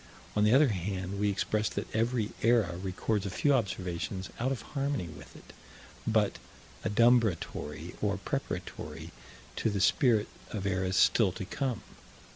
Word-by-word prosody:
On 105 - +3
the 105 - +5
other 145 0 +6
hand, 95 0 -3
we 105 0 +2
express 105 +2 0
that - - -3
every 115 -1 +1
era 115 -7 +3
records 95 +2 -1
a - - -2
few 140 +10 +2
observations 95 -4 -2
out 130 +3 +1
of 135 - -3
harmony 140 - -1
with 75 - -12
it, - - -14 0.5
but 110 -2 +2 0.4
adumbratory 115 -3 +2
or - - +1
preparatory - - -5 0.5
to 115 - +1
the 100 -1 -1
spirit 110 +4 +4 0.2
of 100 -3 -4
eras 95 -1 0
still 105 -5 +5
to 95 0 -5
come. 130 +2 -2
105 Hz, 145 wpm, -30 LUFS, 95-115 Hz, 0.5 s, other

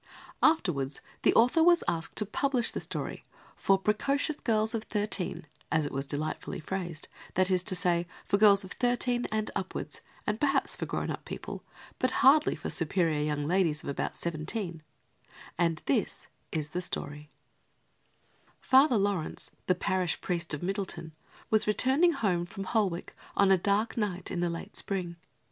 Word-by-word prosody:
Afterwards 150 - +2 0.2
the - - +5
author 250 +8 +5
was 345 +1 +5
asked 165 -1 -2
to 210 - +1
publish 250 +3 0
the - - -3
story - - -4 0.3
"for 195 -1 +3
precocious 275 +9 0
girls 220 -1 +1
of 225 -1 -3
thirteen," 205 -6 -1 0.3
as 155 -1 +2
it 145 - -4
was 135 +1 -3
delightfully 155 +3 -3
phrased; 175 -2 -5 0.3
that 185 +1 +3
is 185 -1 +3
to 190 - +3
say, 175 -1 +1 0.2
for 200 - +1
girls 200 -2 +7
of 190 - -10
thirteen 245 0 +1
and 215 0 -1
upwards - - -4 0.2
and 210 +1 -1
perhaps 290 -2 +2
for - - -4
grown - - -2
up - - -6
people, - - -7 0.4
but 255 - +2 0.2
hardly 295 +3 +6
for - - -4
superior 165 -2 +1
young 150 -1 -1
ladies 165 -2 +1
of - - -5
about 140 - -3
seventeen; 170 +1 -3 0.7
and 165 -2 0
this - - -1 0.3
is 150 -2 -3
the 180 - -2
story: 150 -4 -5 1.3
Father 265 -2 +5
Laurence, 200 -5 -2 0.2
the 185 - +3
parish 180 -1 0
priest 170 -2 -2
of 150 +1 -2
Middleton, 190 -4 -3 0.4
was 215 -1 +4
returning 270 +10 +4
home 175 - 0
from 195 - -6
Holwick 195 -4 -1 0.2
on 200 -1 +5
a - - +8
dark 205 +6 +1
night 190 -5 -2
in 175 - -2
the 175 0 +1
late 170 0 -6
spring. 180 -4 -3
190 Hz, 160 wpm, -29 LUFS, 170-220 Hz, 1.3 s, a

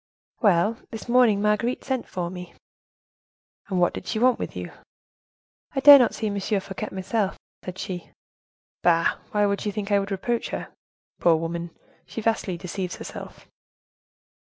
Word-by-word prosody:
"Well, 205 +2 +3
this 225 0 -8
morning 235 -4 +4
Marguerite 210 +4 +1
sent 260 -3 -2
for 175 -1 -4
me." 180 -2 -9 1.1
"And 185 -3 -1
what 175 - +3
did - - -7
she 220 - -2
want 250 +2 +3
with - - -5
you?" - - -5 1.0
"'I - - +2
dare 285 0 +11
not 245 - +2
see 220 - -3
M. 205 -1 -1
Fouquet 195 -1 -2
myself,' 190 +1 -1 0.3
said 185 0 -7
she." 180 -3 -5 0.7
"Bah! 165 -1 +3
why 210 0 +2
should 200 0 -1
she 210 - -1
think 205 0 -4
I 200 - +5
would 195 0 -3
reproach 225 +4 -2
her? - - -5 0.5
Poor 170 -1 +5
woman, 170 +1 -3 0.4
she - - -6
vastly 215 -5 0
deceives 180 +1 -4
herself." - - -9
200 Hz, 160 wpm, -25 LUFS, 180-225 Hz, 1.1 s, dare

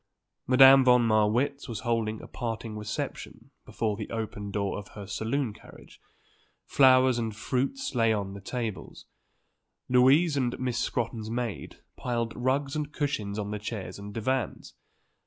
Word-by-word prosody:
Madame 135 +1 +8
von 125 -1 +5
Marwitz 115 +6 +1
was 115 -3 -4
holding 115 -3 -1
a - - -9
parting 115 -2 -5
reception 105 -1 -6 0.2
before 110 -2 -2
the 105 0 -6
open 110 -2 -5
door 100 0 -2
of 105 - -10
her 100 - -6
saloon 110 +5 -2
carriage. - - -16 0.6
Flowers 130 -2 +5
and 110 -2 -3
fruits 140 - -2
lay 115 -3 +3
on 100 -3 -2
the 100 - -9
tables. 115 -1 -5 0.8
Louise 135 +6 +4
and 125 -3 -1
Miss 125 -2 -1
Scrotton's 115 -2 -2
maid 120 -2 -4 0.2
piled 115 -2 -2
rugs 135 +3 0
and 150 -1 -3
cushions 125 -10 -2
on 105 -1 -3
the 105 - -3
chairs 100 -3 -6
and 100 +1 -8
divans. 115 +1 -2
115 Hz, 145 wpm, -28 LUFS, 105-130 Hz, 0.8 s, Madame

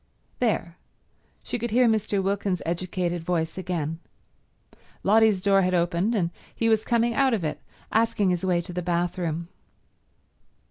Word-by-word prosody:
There—she 225 +2 -5
could 235 +2 -2
hear 245 +3 +4
Mr. 215 -3 +1
Wilkins's 195 -1 -1
educated 175 0 -2
voice 165 -2 -1
again. 165 -4 -3 1.0
Lotty's 215 -1 +4
door 195 0 +4
had 185 0 +1
opened, 175 +6 +1
and 170 -5 0 0.2
he 230 - +1
was 220 -1 +3
coming 235 0 +1
out 265 -1 +3
of 195 - -4
it 155 - -3 0.3
asking 215 -4 +2
his 180 0 -1
way 180 -2 +2
to 180 +1 -8
the 180 - -2
bathroom. 170 -1 -1
185 Hz, 140 wpm, -25 LUFS, 170-220 Hz, 1.0 s, hear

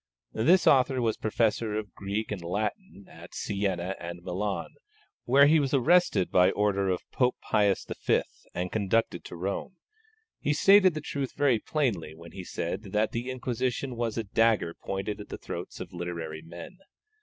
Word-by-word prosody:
This 170 +12 +4
author 130 -1 +4
was 115 -3 +1
Professor 110 0 0
of 105 -4 -4
Greek 100 +3 -3
and 100 -3 -3
Latin 100 - -4
at - - -13
Sienna 95 -2 -2
and 85 0 -7
Milan, 95 +3 -2 0.6
where 140 +3 +6
he 155 +2 +5
was 140 -1 +1
arrested 135 - +3
by 90 0 +5
order 100 -1 +1
of 90 - -1
Pope 125 -1 +2
Pius 105 -3 +1
V. - - 0 0.3
and 90 +1 -2
conducted 110 -2 0
to - - -8
Rome. 95 - -4 0.6
He 150 - +1
stated 190 +2 +6
the 155 - -3
truth 140 -3 -4
very 135 -5 +3
plainly 105 - -1
when 85 +1 -12
he 95 - -7
said 85 +1 -3
that 105 +1 +2
the 120 +2 -3
Inquisition 130 0 -2
was 115 -1 -2
a 115 - 0
dagger 110 -4 +2
pointed 95 +3 -4
at 100 - -11
the - - -5
throats - - -7
of - - -8
literary 85 -3 -5
men. 85 - -10
105 Hz, 165 wpm, -28 LUFS, 95-130 Hz, 0.6 s, where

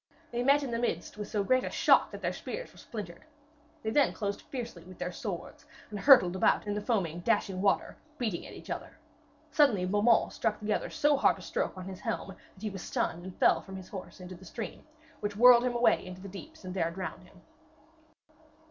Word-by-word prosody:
They 240 0 -1
met 280 +3 +4
in 265 - -4
the 230 - -1
midst 240 - -2
with 210 -1 -5
so 205 -2 -1
great 255 +5 +3
a - - -2
shock - - +4
that - - -9
their - - 0
spears - - -6
were - - -17
splintered. 200 -7 -8 0.6
They 220 - -1
then 285 +4 +3
closed 205 -2 -3
fiercely 235 -10 -7
with 185 0 -13
their 180 - -3
swords, 180 -2 -6 0.3
and 205 - -4
hurtled 195 -8 +7
about 190 - +3
in 205 - -1
the 210 - -2
foaming, 190 -7 -1
dashing 195 -1 0
water, 200 0 +1 0.2
beating 220 - -2
at - - -11
each - - -9
other. - - -6 0.5
Suddenly 240 -12 +4
Beaumains 205 +5 +3
struck 220 -2 -1
the 210 0 0
other - - -2
so 295 -1 +2
hard - - +4
a - - -12
stroke - - -2
on 185 - -7
his 190 -1 -7
helm - - -3
that 195 +1 -15
he 215 - -2
was 195 -1 -7
stunned, 175 0 -2
and 185 - -9
fell - - +4
from 190 - -10
his 190 -1 -9
horse 190 -1 -8
into 180 0 -8
the 185 +1 -13
stream, 225 - -7 0.3
which 205 -1 -3
whirled 245 +1 +8
him 245 -1 0
away 240 0 +3
into 185 0 -9
the 200 - -8
deeps, 200 - -11
and 185 - -5
there 170 -3 0
drowned 175 -1 -6
him. - - -19
205 Hz, 220 wpm, -30 LUFS, 185-240 Hz, 0.6 s, whirled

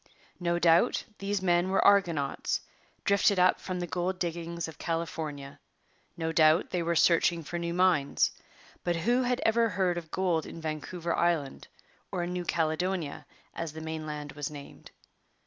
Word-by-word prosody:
No 175 -1 0
doubt 170 +6 +4 0.2
these 200 -1 -2
men 175 0 +2
were 195 - +2
'argonauts' 170 -9 +2 0.4
drifted 200 0 +3
up 180 0 +4
from 185 -1 -4
the 175 - -2
gold 175 +4 -2
diggings 170 -1 -3
of 160 - -11
California; 155 -4 -4 0.6
no 160 -1 -1
doubt 160 +1 +4
they 180 - 0
were 170 0 0
searching 170 0 +3
for 175 +4 -4
new 170 0 -2
mines; 175 -5 +2 0.5
but 175 -1 0
who 240 +10 +2
had 250 -1 0
ever 230 +1 +3
heard 185 -4 0
of 160 -2 -14
gold 175 -3 0
in - - -8
Vancouver 165 +2 -3
Island, 165 -6 0 0.4
or 180 -2 -1
in 175 +1 -3
New 180 -1 -3
Caledonia, 165 0 -1 0.3
as 165 -2 -5
the 160 - -7
mainland 155 -2 -5
was 145 -2 -4
named? 145 -2 -11
170 Hz, 160 wpm, -29 LUFS, 160-180 Hz, 0.6 s, doubt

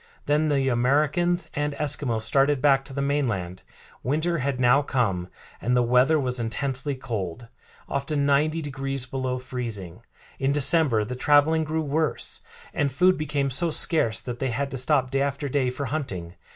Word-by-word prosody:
Then 150 +2 +2
the 140 -3 +1
Americans 145 +8 +1
and 145 0 -1
Eskimos 140 -7 0
started 140 +4 +2
back 135 -1 +3
to 135 - -9
the 140 +1 -2
mainland. 115 -11 -1 0.4
Winter 160 +5 0
had 135 -1 -2
now 125 +3 +5
come, 105 -11 -1 0.3
and 125 +3 +1
the 125 - +4
weather 125 +6 +4
was 125 -2 -1
intensely 130 +4 -2
cold, 115 -3 -5 0.4
often 140 +1 -1
ninety 155 +3 +2
degrees 135 -2 -3
below 130 0 -3
freezing. 115 -7 -6 0.4
In 135 0 +1
December 145 -6 +3
the 125 - -5
traveling 145 +5 +3
grew 160 +1 -2
worse, 155 +1 -1 0.3
and 140 -2 0
food 185 +7 +4
became 145 -2 -1
so 165 +7 0
scarce 155 -8 +1
that 120 -1 -6
they 135 - -1
had 135 +4 -2
to 135 - -3
stop 130 0 +2
day 135 0 +1
after 140 +1 -2
day 130 -2 0
for 135 +3 -4
hunting. 100 - -4
135 Hz, 165 wpm, -25 LUFS, 125-145 Hz, 0.4 s, now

